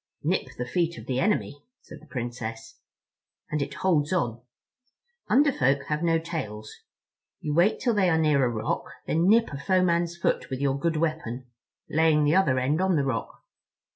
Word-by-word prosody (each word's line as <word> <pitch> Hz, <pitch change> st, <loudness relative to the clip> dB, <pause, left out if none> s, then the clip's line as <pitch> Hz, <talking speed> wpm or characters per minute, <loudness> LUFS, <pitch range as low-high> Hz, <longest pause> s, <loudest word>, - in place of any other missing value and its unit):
"Nip -, -, 0 dB
the 125 Hz, -, -3 dB
feet 170 Hz, +6 st, -1 dB
of -, -, -9 dB
the 130 Hz, -1 st, -1 dB
enemy," 175 Hz, -7 st, -1 dB, 0.2 s
said -, -, -13 dB
the 155 Hz, -, -17 dB
Princess, 120 Hz, -3 st, -6 dB, 0.7 s
"and 150 Hz, -1 st, 0 dB
it 140 Hz, 0 st, -4 dB
holds 155 Hz, -5 st, +1 dB
on. 120 Hz, -11 st, -1 dB, 0.9 s
Under 285 Hz, +2 st, +5 dB
Folk 140 Hz, -, +1 dB
have 150 Hz, +1 st, -1 dB
no 165 Hz, -1 st, +2 dB
tails. 110 Hz, -11 st, -5 dB, 0.7 s
You 150 Hz, -, -3 dB
wait 175 Hz, +7 st, +3 dB
till 240 Hz, -3 st, +1 dB
they 195 Hz, -4 st, +3 dB
are 160 Hz, -, +3 dB
near 150 Hz, -4 st, +3 dB
a 125 Hz, -, +2 dB
rock; 110 Hz, -2 st, -2 dB, 0.2 s
then 165 Hz, +3 st, +1 dB
nip 225 Hz, -3 st, +4 dB
a 140 Hz, -, -5 dB
foe 185 Hz, +4 st, +2 dB
man's 170 Hz, -1 st, +1 dB
foot 170 Hz, -, -1 dB
with 130 Hz, -2 st, -4 dB
your 140 Hz, -1 st, 0 dB
good 165 Hz, +1 st, 0 dB
weapon, 155 Hz, -6 st, -2 dB, 0.4 s
laying 160 Hz, -1 st, +3 dB
the 150 Hz, +3 st, +3 dB
other 185 Hz, -9 st, +3 dB
end 140 Hz, +7 st, +1 dB
on 190 Hz, -1 st, +2 dB
the 140 Hz, -3 st, +1 dB
rock. 115 Hz, -5 st, -4 dB
150 Hz, 185 wpm, -26 LUFS, 130-170 Hz, 0.9 s, Under